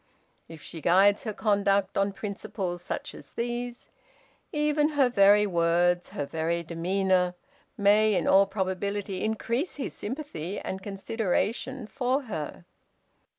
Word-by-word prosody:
If 160 -2 -11
she 165 - -8
guides 195 +6 +4
her 215 - -1
conduct 200 -2 +1
on 195 0 +1
principles 195 -3 -4
such - - -5
as - - -13
these, 240 +1 -4 0.6
even 300 0 +2
her 265 -3 +5
very 205 -2 +5
words, 175 -1 +2
her 145 - -4
very 165 +3 -1
demeanor, 180 +2 +1 0.4
may 210 +1 +4
in - - +1
all 195 +1 +6
probability 195 0 -2
increase 235 +8 -1
his 280 - -4
sympathy 205 - -5
and 190 0 -5
consideration 225 +5 -2
for 260 +4 -1
her. 150 - -6
200 Hz, 125 wpm, -27 LUFS, 180-230 Hz, 0.6 s, all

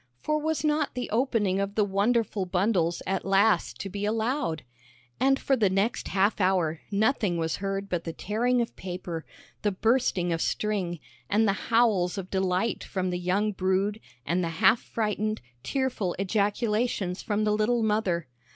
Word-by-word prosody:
For 305 - 0
was 315 -1 -1
not 300 -2 +1
the 250 - -4
opening 220 -5 +1
of 200 0 -2
the 215 - +3
wonderful 205 0 +1
bundles 180 -2 +1
at 190 0 -1
last 195 +3 +2
to - - -4
be 200 +1 -5
allowed! 220 - -1 0.6
And 270 0 +4
for 270 - +2
the 215 -6 +2
next 195 +5 0
half 200 +2 +1
hour 175 -4 +1
nothing 210 -3 +1
was 160 -1 -1
heard 195 0 -3
but 175 -3 -2
the 165 - -4
tearing 240 +8 0
of 235 - -4
paper, 175 -3 -6 0.3
the 205 - +1
bursting 195 -4 +1
of 165 - -2
string, 190 -6 -1 0.3
and 215 +2 +3
the 195 - +3 0.2
howls 215 -6 +3
of 190 -1 -6
delight 190 +3 0
from 185 -1 -2
the 180 - -2
young 195 +4 +1
brood 195 +2 0 0.3
and 175 +2 0
the 165 - -1
half 225 +6 +5
frightened, 215 -1 -2 0.2
tearful 245 - -1
ejaculations 205 0 0
from 210 0 -1
the 210 0 +2
little 225 +2 +1
mother. 210 -6 +1
205 Hz, 165 wpm, -27 LUFS, 185-225 Hz, 0.6 s, half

